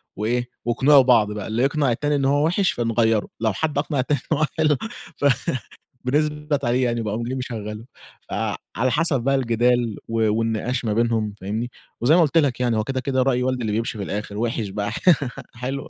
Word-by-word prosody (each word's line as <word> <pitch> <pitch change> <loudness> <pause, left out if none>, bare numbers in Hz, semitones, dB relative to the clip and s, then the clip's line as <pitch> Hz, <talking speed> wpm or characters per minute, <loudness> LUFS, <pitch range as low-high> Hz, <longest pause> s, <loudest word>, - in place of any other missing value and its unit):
وإيه 120 +3 -1 0.2
واقنعوا 135 +4 +5
بعض 115 -5 +4
بقى، 105 - -5
اللي 110 +3 0
يقنع 140 -1 +2
التاني 145 +5 0
إن 140 -1 0
هو 145 +2 +3
وِحِش 180 +4 +2
فنغيّره، 115 -2 +1
لو 110 -1 +1
حد 150 +7 -2
أقنع 145 -1 0
التاني 140 +2 +1
إن 155 - +3
هو 155 - +3
حلو 155 -3 +3 1.3
فنثبت 150 +1 0
عليه 125 +2 +2
يعني 120 -1 0
باقوم 110 +2 -2
جاي 125 +2 -3
مشغّله، 110 -3 -5 0.4
فعلى 125 +6 -2
حَسَب 150 -3 +1
بقى 135 +1 +2
الجدال 120 -2 +1
و 115 -1 +1
والنقاش 115 +2 -1
ما 105 - 0
بينهم، 115 -2 +1
فاهمني، 110 +5 -3 0.3
وزي 135 +7 +5
ما 180 - +6
قُلت 165 0 +2
لك 140 -6 +2
يعني 120 -3 +1
هو 110 - +1
كده، 130 +3 -2
كده 130 -1 0
رأي 125 -1 +2
والدي 130 -1 -1
اللي 110 - -1
بِيمشي 115 0 -2
في 100 - -3
الآخِر 105 +1 -4
وِحِش 115 -2 -1
بقى 100 +1 -3
ح - - -4 0.6
حلو. 130 +3 -4
120 Hz, 195 wpm, -23 LUFS, 115-140 Hz, 1.3 s, ما